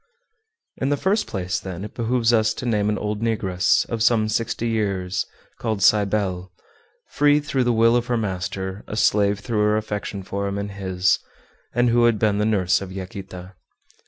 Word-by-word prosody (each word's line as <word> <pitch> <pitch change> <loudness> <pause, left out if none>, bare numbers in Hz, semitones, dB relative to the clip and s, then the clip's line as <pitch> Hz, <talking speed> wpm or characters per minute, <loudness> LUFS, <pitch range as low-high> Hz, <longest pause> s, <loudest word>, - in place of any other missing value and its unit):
In 135 - -1
the 145 - +1
first 200 +8 +1
place, 90 -3 -2
then, 95 0 -6
it - - -9
behooves 120 0 +1
us 110 -1 +2
to - - -6
name 105 -3 +1
an 105 - 0
old 105 0 -3
negress, 100 -6 +1
of 115 -1 -3
some 110 -2 +3
sixty 115 +1 -1
years, 95 -5 -1 0.3
called 110 -4 -2
Cybele, 100 -3 +2 0.6
free 145 0 +4
through 135 -3 -1
the 120 - +3
will 115 +1 +4
of 120 0 0
her 120 - +1
master, 95 -1 -3
a 105 - -5
slave 105 -1 +2
through 115 -4 -2
her 105 0 +3
affection 105 -2 -4
for 100 +1 -3
him 100 0 -3
and 100 0 -4
his, 95 -2 +1 0.6
and 120 0 +3
who 120 0 +4
had 115 -2 +3
been 105 -1 +1
the 105 - +1
nurse 100 -3 +2
of 95 -1 -7
Yaquita. 95 -1 -8
105 Hz, 185 wpm, -23 LUFS, 95-115 Hz, 0.6 s, free